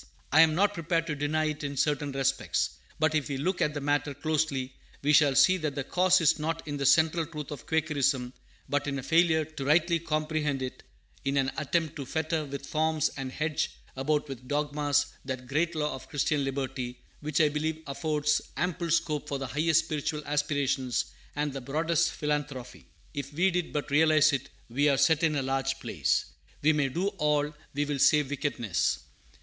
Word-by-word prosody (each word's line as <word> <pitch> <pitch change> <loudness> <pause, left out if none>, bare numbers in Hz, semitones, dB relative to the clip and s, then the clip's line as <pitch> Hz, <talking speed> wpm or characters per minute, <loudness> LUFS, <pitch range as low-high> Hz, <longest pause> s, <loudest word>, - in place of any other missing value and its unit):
I 155 - +7
am 160 -1 +5
not 205 +3 +3
prepared 165 -2 0
to 150 -2 -2
deny 150 +2 0
it 155 0 -3
in 140 -1 -4
certain 145 0 +1
respects. 135 0 0 0.3
But, 155 0 +2
if 150 -2 0
we 140 - -2
look 180 +6 -1
at 150 0 +1
the 145 - -3
matter 145 0 0
closely, 145 -3 -1 0.3
we 150 +1 +3
shall 145 -2 +5
see 185 +7 +6
that 155 -5 -3
the 140 - -2
cause 185 +5 +3
is 160 - +3
not 165 +1 -3
in 145 -1 -3
the 140 -1 +1
central 160 +3 +4
truth 150 -3 -7
of 145 - -8
Quakerism, 140 -5 +1 0.3
but 145 0 -1
in 140 -1 -1
a 135 - -5
failure 160 0 +3
to 155 -2 -7
rightly 165 +4 +3
comprehend 155 -3 -1
it; 130 - -6 0.4
in 140 0 0
an 135 -1 +2
attempt 155 +1 -1
to 140 -3 -6
fetter 160 0 -1
with 140 0 -6
forms 155 0 +1
and 135 -2 -5
hedge 155 +2 -1 0.3
about 150 +3 0
with 130 -2 -8
dogmas 145 0 +1 0.2
that 130 -1 -5
great 160 +6 0
law 150 -1 -1
of 130 - -9
Christian 145 0 0
liberty, 130 -2 -3 0.2
which 150 +1 -1
I 155 -2 +5
believe 155 +2 -2
affords 150 +1 0 0.2
ample 175 +1 -1
scope 155 -2 0
for 140 - -1
the 135 - -4
highest 160 +5 +2
spiritual 150 0 -3
aspirations 145 -3 0 0.2
and 145 -1 -1
the 135 - -5
broadest 165 +5 +1
philanthropy. 145 -4 -4 0.3
If 140 -1 -5
we 185 +5 +3
did 180 -1 -1
but 145 -1 -3
realize 155 0 +5
it, 135 - -2 0.2
we 140 +5 +2
are 140 - +3
"set 160 +1 +4
in 160 -2 +2
a 140 - 0
large 135 0 -1
place." - - 0 0.4
"We 155 +2 +5
may 145 -2 +1
do 180 +9 0
all 150 -1 +1 0.2
we 145 +1 +1
will 145 -1 -2
save 150 0 +4
wickedness." 110 - -1
150 Hz, 190 wpm, -28 LUFS, 140-155 Hz, 0.4 s, I